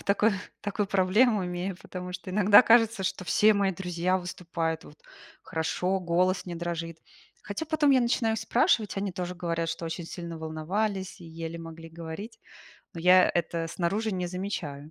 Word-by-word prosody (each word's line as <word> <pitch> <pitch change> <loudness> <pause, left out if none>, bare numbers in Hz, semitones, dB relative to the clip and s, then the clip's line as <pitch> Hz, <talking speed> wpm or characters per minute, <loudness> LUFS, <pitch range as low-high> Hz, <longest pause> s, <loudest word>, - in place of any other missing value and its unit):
в - - -14
такой, 210 +2 +3 0.3
такую 205 0 -2
проблему 195 +2 +3
имею, 180 +1 -3
потому 180 0 -7
что 185 - -7
иногда 205 +3 +7
кажется, 225 -3 +4
что 185 0 -2
все 215 +4 +4
мои 200 -1 +2
друзья 180 0 -1
выступают 170 -2 -3
вот 150 - -15 0.4
хорошо, 180 +4 -1
голос 180 +2 +1
не 175 - -5
дрожит. 165 -1 -4 0.4
Хотя 205 +10 -4
потом 300 -2 +3
я 260 - +5
начинаю 235 -2 +1
спрашивать, 220 -3 +2
они 195 -1 -2
тоже 180 -1 -4
говорят, 170 -1 -2
что 165 - -4
очень 165 +1 -4
сильно 170 -1 -7
волновались 185 +6 -3
и - - -10
еле 165 0 -6
могли 165 0 -9
говорить. 165 +7 -8 0.5
Но 165 - -6
я 180 +1 +6
это 170 -1 -1
снаружи 200 +6 -1
не 180 -1 -2
замечаю. 170 -6 -5
180 Hz, 165 wpm, -28 LUFS, 165-200 Hz, 0.5 s, иногда